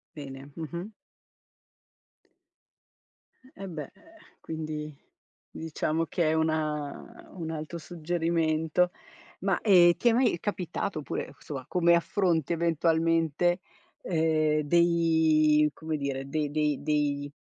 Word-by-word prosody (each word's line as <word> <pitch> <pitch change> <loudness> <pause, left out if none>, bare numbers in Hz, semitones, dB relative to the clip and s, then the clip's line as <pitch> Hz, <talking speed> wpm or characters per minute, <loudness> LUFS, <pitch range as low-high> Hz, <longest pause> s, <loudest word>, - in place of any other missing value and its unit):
Bene, 140 -1 -9
mh-mh. 170 +3 -5 2.7
Eh 195 0 -6
beh, 155 -3 -5
ehm, - - -13 0.5
quindi 155 -1 -5 0.6
diciamo 160 0 -2
che 165 -2 0
è - - +2
una 155 -2 -2
un 165 -4 -5
altro 155 +1 -5
suggerimento, 165 +1 0 0.5
ma, 195 -1 0
ehm, 175 -5 +6
ti 240 - +1
è 235 - +6
mai 240 -7 +2
capitato, 180 -3 -3
oppure 145 - -4
insomma, 135 -4 -6
come 170 -1 +3
affronti 170 -2 +1
eventualmente, 165 +1 +2 0.4
ehm, 155 -2 +2
dei 160 -2 +4
come 160 -1 -4
dire, 135 -1 -3
dei 150 -1 -1
dei 150 -1 0
dei 145 -1 0
160 Hz, 105 wpm, -28 LUFS, 150-170 Hz, 2.7 s, ehm